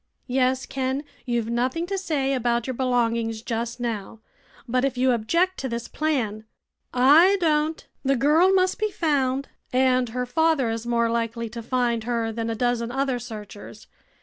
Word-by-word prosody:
"Yes, 255 0 +1
Ken. 265 +1 -2 0.2
You've 235 -2 -1
nothing 255 +8 0
to 390 +2 -3
say 300 -8 -1
about 240 -2 0
your 260 - -3
belongings 230 -3 0
just 235 +1 -3
now. 225 -3 -4 0.5
But 250 +2 +1
if 270 -2 0
you 255 +1 +3
object 335 +12 +1
to 265 - -3
this 235 0 -4
plan 235 -9 -2 0.3
" - - -53 0.3
"I 390 +3 +5
don't. 315 -1 +1 0.2
The 275 0 +2
girl 305 +8 +4
must 375 -1 +2
be 430 0 +1
found, 275 -7 0 0.2
and 255 -1 +2
her 250 +2 -2
father 310 -2 +2
is 225 +1 -4
more 235 -1 +2
likely 230 0 -2
to 235 +1 -7
find 235 -1 0
her 230 -2 -1
than 230 0 -3
a 225 - -2
dozen 240 0 0
other 265 -1 -1
searchers. 215 -2 -9
250 Hz, 170 wpm, -24 LUFS, 230-275 Hz, 0.5 s, I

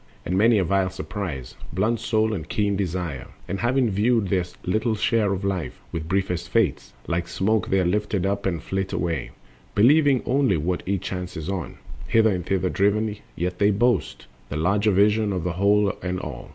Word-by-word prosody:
And 90 - -1
many 110 +3 +5
a 95 - +3
vile 95 +1 +1
surprise 85 - -5 0.2
Blunts 110 +7 0
soul 110 -1 +1
and 80 -7 -5
keen 105 -1 0
desire. 90 -7 -3 0.2
And 95 +2 -3
having 120 -1 +2
viewed 105 +1 +2
Their 95 -3 +1 0.2
little 110 +4 +1
share 110 -1 +1
of 100 0 -2
life, 90 -9 -3
with 80 -1 -4
briefest 90 -2 -1
fates, 115 -2 0
Like 85 +1 -1
smoke 105 +1 0
they 95 - +3
are 90 - +1
lifted 100 0 0
up 100 0 -1
and 85 -4 -2
flit 95 0 -3
away, 85 -2 -2 0.5
Believing 140 +4 +5
only 130 -7 +2
what 90 +4 -1
each 95 -2 -1
chances 90 -3 -5
on, 95 -3 -4 0.3
Hither 110 -1 +4
and 90 -2 -2
thither 95 +1 0
driven; 105 +2 +1 0.2
yet 90 +1 -3
they 100 0 +4
boast 105 - +1 0.2
The 70 - -3
larger 100 +6 +2
vision 105 +2 +3
of 90 -4 -2
the 90 0 -1
whole 100 +2 +3
and 90 0 -2
all. 75 -8 -7
95 Hz, 185 wpm, -24 LUFS, 90-105 Hz, 0.5 s, many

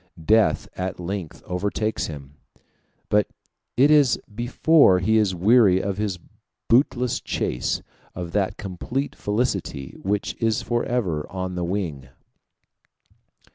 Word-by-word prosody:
Death 110 +2 +3
at 95 0 -4
length 90 -2 -5
overtakes 105 +4 -2
him, 70 -3 -9 0.7
but 105 0 +2 0.5
it 140 +4 +5
is 145 -6 +5
before 120 - +4
he 110 +5 +2
is 100 -4 +1
weary 100 0 +5
of 100 +1 -3
his 100 -4 -1 0.5
bootless 125 0 +2
chase 60 - -2 0.3
of 85 -1 -5
that 100 +1 0
complete 110 +8 -4
felicity 105 - -2
which 100 +1 -1
is 115 -1 +1
forever 115 -10 -1
on 95 0 -4
the 90 -1 -3
wing. 85 -8 -3
100 Hz, 115 wpm, -23 LUFS, 90-115 Hz, 0.7 s, it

